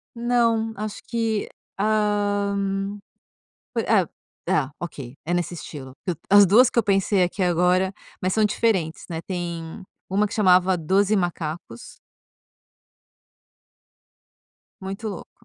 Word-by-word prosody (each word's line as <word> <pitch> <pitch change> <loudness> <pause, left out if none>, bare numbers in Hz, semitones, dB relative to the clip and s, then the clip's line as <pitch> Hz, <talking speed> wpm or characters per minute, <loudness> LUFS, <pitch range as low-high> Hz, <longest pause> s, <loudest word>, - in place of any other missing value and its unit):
Não, 230 -2 +1
acho 210 0 -5
que, 225 -3 -1 0.3
hã, 205 -1 0 0.8
po 235 - 0
é 200 -7 +2 0.4
é 155 -8 +1
ok, 140 -7 -7
é 175 - -1
nesse 175 0 -1
estilo. 135 -5 -8
Que 180 - -1
as 205 0 +8
2 230 +7 +6
que - - -8
eu 235 - +5
pensei 195 -1 +2
aqui 180 +3 -2
agora, 180 +1 +2 0.3
mas 185 0 0
são 220 +1 +3
diferentes, 195 -6 0
né, 165 -1 -4
tem 170 +1 -5 0.3
uma 205 +3 +2
que 205 - -9
chamava 185 -2 +4
"12 195 +6 +2
Macacos". 165 - -4 2.9
Muito 195 +3 -5
louco. 195 - -8
195 Hz, 120 wpm, -24 LUFS, 175-210 Hz, 2.9 s, as